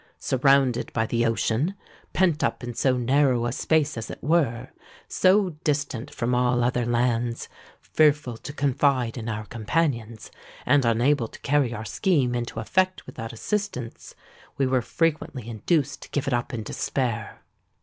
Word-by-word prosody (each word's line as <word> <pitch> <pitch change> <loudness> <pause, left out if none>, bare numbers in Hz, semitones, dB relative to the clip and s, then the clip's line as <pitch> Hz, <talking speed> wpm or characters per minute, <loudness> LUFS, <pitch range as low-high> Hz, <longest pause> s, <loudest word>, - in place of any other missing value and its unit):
Surrounded 135 -1 +2
by 110 - +1
the 115 +1 0
ocean—pent 155 - -1
up - - -1
in 120 0 -5
so 130 +2 +1
narrow 130 -1 +2
a 120 - -1
space, 155 +3 +1
as 115 - -6
it - - -6
were—so 170 - +1
distant 145 -5 -1
from 120 +1 -2
all 125 0 +2
other 125 -1 0
lands—fearful 120 +3 0
to 145 - -8
confide 135 -4 +1
in 115 -2 -5
our 110 0 -4
companions—and 120 +2 -1
unable 120 +2 +2
to - - -14
carry 140 -3 +2
our 110 -2 -5
scheme 140 - +1
into 120 -2 -3
effect 185 +11 0
without 115 -1 -7
assistance, 130 - -4 0.4
we 135 - +2
were 130 -1 +2
frequently 150 -4 -1
induced 140 - -1
to - - -11
give 145 - -2
it 140 - -1
up 120 +2 -1
in 115 -4 -4
despair. 120 -1 -3
125 Hz, 140 wpm, -25 LUFS, 115-145 Hz, 0.4 s, Surrounded